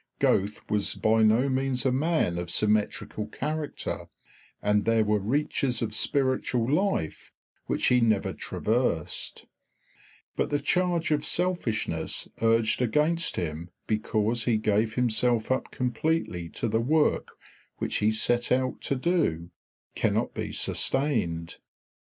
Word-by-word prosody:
Goethe 100 +2 +1
was 105 -1 0
by 110 +1 +2
no 110 +5 +4
means 130 -1 0
a 130 - +3
man 135 - 0
of 85 0 -5
symmetrical 105 +2 0
character, 150 +1 -4 0.5
and 105 0 +1
there 115 0 +3
were 105 0 +1
reaches 130 +3 0
of 110 -1 -3
spiritual 130 -1 +1
life 155 - -1 0.4
which - - 0
he 125 -1 +4
never 110 -4 +1
traversed; 110 -8 -1 0.9
but - - -1
the 145 - +1
charge 170 +2 0
of 150 -1 +1
selfishness 175 -11 0
urged 115 +1 +2
against 150 +8 +1
him 85 0 -4 0.2
because 110 +1 0
he 115 -3 +2
gave 110 +1 0
himself 120 -1 +2
up 130 - 0
completely 125 - -2
to 115 - -3
the 110 +1 +1
work 150 +5 +1 0.4
which - - -1
he 105 - +2
set 120 +2 0
out 130 0 0
to 140 - -1
do 130 - 0 0.4
cannot - - 0
be - - -4
sustained. 105 - 0
120 Hz, 130 wpm, -27 LUFS, 105-140 Hz, 0.9 s, no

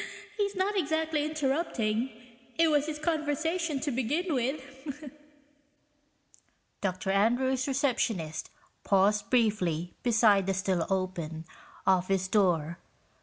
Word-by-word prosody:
(He's 405 -2 -1
not 385 +2 0
exactly 315 -3 0
interrupting 270 -6 0 0.5
it 330 0 +4
was 295 0 +2
his 305 -1 -3
conversation 315 0 -1
to 290 - -1
begin 295 +8 -1
with!) 275 +2 -4 1.7
Dr. 190 0 -1
Andrews' 250 +6 +2
receptionist 230 - -1 0.3
paused 205 +1 +2
briefly 185 -8 +1
beside 220 -5 +4
the 195 - +1
still 190 -3 0
open 175 -4 -2 0.4
office 190 0 +2
door. 170 -5 +1
245 Hz, 100 wpm, -29 LUFS, 190-300 Hz, 1.7 s, it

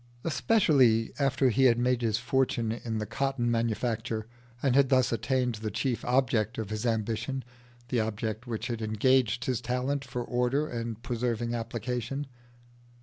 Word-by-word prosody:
Especially 140 - +3
after 135 -2 +3
he 130 +4 +3
had 120 -2 +5
made 125 0 +1
his 110 -2 +1
fortune 120 -1 0
in 115 -1 -3
the 105 - -2
cotton 135 -1 -1
manufacture, 115 -1 -1 0.4
and 135 -3 +3
had 140 -1 +5
thus 130 -2 +3
attained 125 +1 0
the 110 - -2
chief 120 +4 -2
object 120 -4 +1
of 110 -2 -4
his 110 +3 -2
ambition 115 +4 -1 0.5
the 125 - +1
object 110 +2 -3
which 115 -2 -3
had 115 -2 -3
engaged 120 +2 +2
his 125 -2 -1
talent 125 +3 -1
for 125 -2 -4
order 125 +5 0
and 115 -2 -5
persevering 120 -1 -1
application. 125 +3 -3
120 Hz, 150 wpm, -29 LUFS, 115-130 Hz, 0.5 s, had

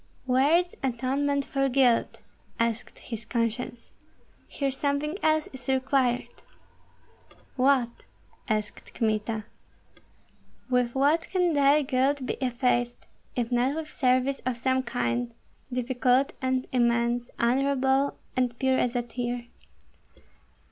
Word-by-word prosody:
"Where 265 +5 +4
is 350 0 -2
atonement 270 +3 0
for 275 0 0
guilt?" 250 -3 +2 0.4
asked 230 0 -1
his 225 -2 -7
conscience. 235 +1 -3 0.6
"Here 275 -1 -2
something 285 +3 -1
else 310 0 +2
is 255 -2 -9
required!" 260 -2 0 1.1
"What?" 255 -3 +2 0.5
asked 215 -1 -3
Kmita. 215 -1 -1 1.3
"With 250 -1 +1
what 295 +5 +2
can 360 -3 +2
thy 285 +1 +4
guilt 265 +1 +1
be - - -1
effaced, 245 -1 0 0.3
if 240 -1 -1
not 250 +4 +2
with 315 -1 -5
service 255 +1 +1
of 255 -1 -1
some 260 +2 +1
kind, 240 -1 -2 0.4
difficult 250 +1 +1
and 260 0 0
immense, 240 0 +1
honorable 270 +2 +2 0.2
and 250 -2 0
pure 260 0 +2
as 245 0 0
a 245 - +1
tear? 240 0 -4
255 Hz, 115 wpm, -27 LUFS, 240-275 Hz, 1.3 s, Where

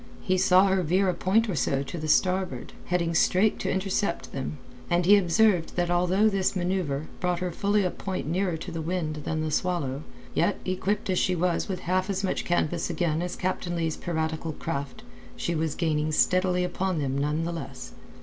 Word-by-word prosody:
He 185 - +2
saw 185 +1 +5
her 190 -1 +2
veer 185 +3 +2
a - - +1
point 220 +7 +2
or 200 - -1
so 135 0 0
to 155 +3 -5
starboard, 185 +3 +1
heading 170 -1 0
straight 185 +5 +3
to - - -2
intercept 190 -1 -1
them, 135 +2 -4 0.3
and 175 0 +2
he 205 +3 +8
observed 185 -1 +3
that 175 -1 0
although 180 +4 +3
this 195 -2 +1
manceuvre 175 -6 -1
brought 180 -1 0
her 180 0 -2
fully 205 +4 +1
a 180 - 0
point 190 -1 -4
nearer 175 +2 0
to 175 - -7
the 165 -1 -4
wind 160 -2 -2
than 155 -1 -1
the 155 0 -2
Swallow, 150 -6 -1 0.3
yet, 185 +4 +1
equipped 190 +2 -1
as 185 - +2
she 185 - +1
was 175 0 0
with 185 - -3
half 185 +2 0
as 195 0 -1
much 190 - -1
canvas 175 -1 0
again 160 -1 0
as 180 0 -3
Captain 180 -1 -2
Leigh's 165 -2 -1
piratical 160 -1 -3
craft, 140 -3 -5 0.3
she 170 - -2
was 160 -2 -1
gaining 155 -2 0
steadily 180 +3 +2
upon 180 0 -1
them 135 -3 -1
none 150 +3 0
the 170 - -2
less. 135 -5 -7
175 Hz, 195 wpm, -27 LUFS, 160-185 Hz, 0.3 s, he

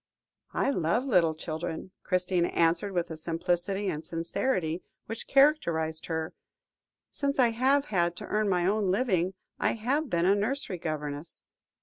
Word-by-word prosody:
"I - - +2
love 180 - +1
little 175 - +3
children," 160 +3 -5
Christina 180 -2 +1
answered, 170 +4 +1
with 175 -2 -1
the 160 - -6
simplicity 175 +5 -1
and 155 -4 -2
sincerity 165 +1 -1 0.2
which 225 +1 -6
characterised 170 - +3
her; 160 -1 -2 0.8
"since 280 -1 -1
I 250 -3 +5
have 265 +5 +2
had 175 -7 +1
to - - -6
earn 210 -1 0
my 180 -2 +2
own 200 0 +2
living, 190 -4 +1 0.2
I - - +2
have 265 +7 -1
been 170 0 +1
a 195 - +5
nursery 205 -2 -1
governess." 150 -1 -5
180 Hz, 145 wpm, -29 LUFS, 165-220 Hz, 0.8 s, I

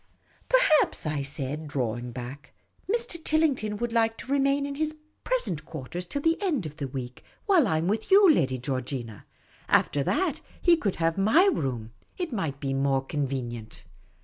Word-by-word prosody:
" - - -34
Per - - +6 0.2
haps," - - -1
I 150 -2 -1
said, 140 +2 -3
drawing 125 -3 -2
back, 130 +4 -8 0.2
" - - -8
Mr. 460 -8 -2
Tillington 275 -10 +1
would 235 +1 -3
like 225 -1 +2
to 260 - -8
remain 280 0 +2
in 280 - -4
his 310 +2 -2 0.3
present 190 - 0
quarters 160 +4 -6
till 285 +9 -3
the 330 +3 +2
end 315 - 0
of 150 0 -7
the 140 -4 -3
week, 125 -2 -7 0.2
while 360 - +4
I 160 - +1
am 165 +2 -1
with 215 +3 -1
you, 395 +1 +7
lyady 135 - +3
Georgina; 130 -4 -4 0.4
after 145 - +3
that, 370 - 0 0.2
he 345 -1 +5
could 210 - -1
have 165 +2 0
my 250 - +5
room; 120 -5 -3 0.3
it 350 -7 -3
might 160 -10 -2
be 135 -1 -2
more 135 0 +1
convenient." 130 -6 -4
160 Hz, 180 wpm, -27 LUFS, -, 0.4 s, you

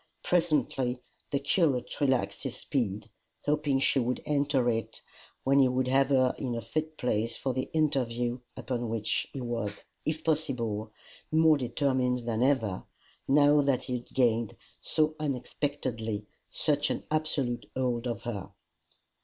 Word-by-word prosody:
Presently 145 -7 +1 0.3
the 140 - +1
curate 140 -2 +1
relaxed 135 -3 +1
his 130 -2 -4
speed, 110 -6 -2 0.4
hoping 150 -2 +2
she 135 0 +3
would 125 0 0
enter 140 -3 +2
it, 115 -1 -1 0.4
when 135 +1 +4
he 135 - +6
would 125 0 0
have 135 +1 +4
her 130 -2 +4
in 125 -4 -2
a 115 - -3
fit 155 +4 -3
place 115 -2 0
for 130 - -1
the 130 +1 -2
interview 125 -6 0 0.2
upon 120 -1 -3
which 110 -2 -1
he 135 - -5
was, 115 -4 -3 0.2
if 155 0 -2
possible, 120 -9 -1 0.4
more 160 0 +6
determined 125 -1 0
than 115 -1 0
ever, 120 -8 +2 0.4
now 145 +1 +6
that 140 -2 +1
he 125 - -4
had 120 - -18
gained, 115 -4 +1 0.2
so 155 0 +1
unexpectedly, 125 -6 -2 0.2
such 145 -1 +2
an - - -2
absolute 150 -6 0
hold 125 -2 0
of 120 -3 -3
her. 105 -6 -4
130 Hz, 145 wpm, -29 LUFS, 120-145 Hz, 0.4 s, he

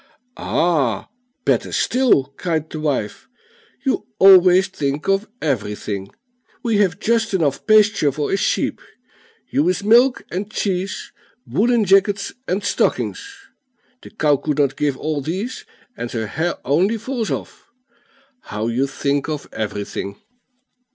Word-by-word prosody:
"Ah, 140 - 0 0.4
better - - +1
still!" 235 - +2
cried 160 -3 -2
the 155 - -5
wife. 140 -9 -2 0.6
"You 270 - 0
always 190 0 +7
think 145 -6 -3
of 195 +2 +1 0.2
everything; 105 -7 -2 0.5
we 230 -3 +1
have 195 -3 +2
just 225 -2 +1
enough 150 -7 0
pasture 210 -8 +4
for 145 +2 -3
a - - +3
sheep. 195 - 0 0.7
Ewe's 180 +7 +1
milk 240 +5 +4
and 195 +3 -3
cheese, 195 -2 -3 0.3
woollen 235 0 +2
jackets 195 +1 +2
and 195 +3 -1
stockings! 400 - -2 0.5
The - - -12
cow 150 -9 +2
could 150 +1 -2
not 140 -2 +2
give 145 -3 -1
all 155 -2 -2
these, 205 - -4 0.3
and 120 - -5
her 110 -2 -2
hair 160 +11 -2
only 180 - +2
falls 230 0 -3
off. - - -6 0.8
How 110 +2 -3
you 130 +4 0
think 140 +2 -1
of 150 -2 -4
everything!" 100 -2 -4
175 Hz, 130 wpm, -20 LUFS, 140-205 Hz, 0.8 s, always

